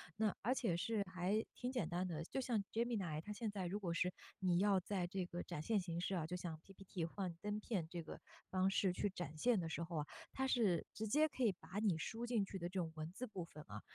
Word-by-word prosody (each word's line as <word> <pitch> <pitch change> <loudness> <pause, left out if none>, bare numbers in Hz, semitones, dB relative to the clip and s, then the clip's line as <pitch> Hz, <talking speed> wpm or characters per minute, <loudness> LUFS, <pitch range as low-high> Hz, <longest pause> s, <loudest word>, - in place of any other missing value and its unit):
那 215 -2 +2
而 240 +5 +3
且 190 -10 +2
是 215 +3 +1
还 185 +4 +2
挺 250 0 -2
简 235 -11 0
单 180 +1 0
的。 165 -2 -2
就 265 - -2
像 235 -5 +1
Gemini 220 -9 +1
它 210 +5 -5
现 215 0 -2
在 195 -3 -2
如 200 +4 -1
果 175 -5 -1
是 180 +2 +2 0.3
你 180 -2 +4
要 200 -1 +5
在 185 0 0
这 185 0 -1
个 175 0 -4
展 170 -4 -4
现 215 +6 +3
形 170 -2 -2
式 190 +2 0
啊， 165 -4 0
就 180 - -2
像 165 -3 -4
PPT 195 -3 -4
幻 180 0 -3
灯 210 0 -1
片 200 -7 -1
这 170 0 -3
个 160 - -7 0.3
方 185 0 +4
式 195 -1 +3
去 205 - +1
展 175 -5 -5
现 230 +6 +4
的 165 - -1
时 170 - -1
候 165 -1 -3
啊， 150 - +1 0.3
它 265 0 +1
是 220 -9 +4
直 220 - -2
接 305 +9 +5
可 265 -3 -2
以 225 - +6
把 180 +3 -5
你 205 -6 +3
输 225 +8 -2
进 235 -4 +2
去 195 - -5
的 175 0 -2
这 190 +1 -1
种 165 -2 0
文 155 +1 -4
字 255 +6 -3
部 190 -4 -4
分 155 -2 -10
啊- 105 0 -6
190 Hz, 305 characters per minute, -41 LUFS, 170-215 Hz, 0.3 s, 以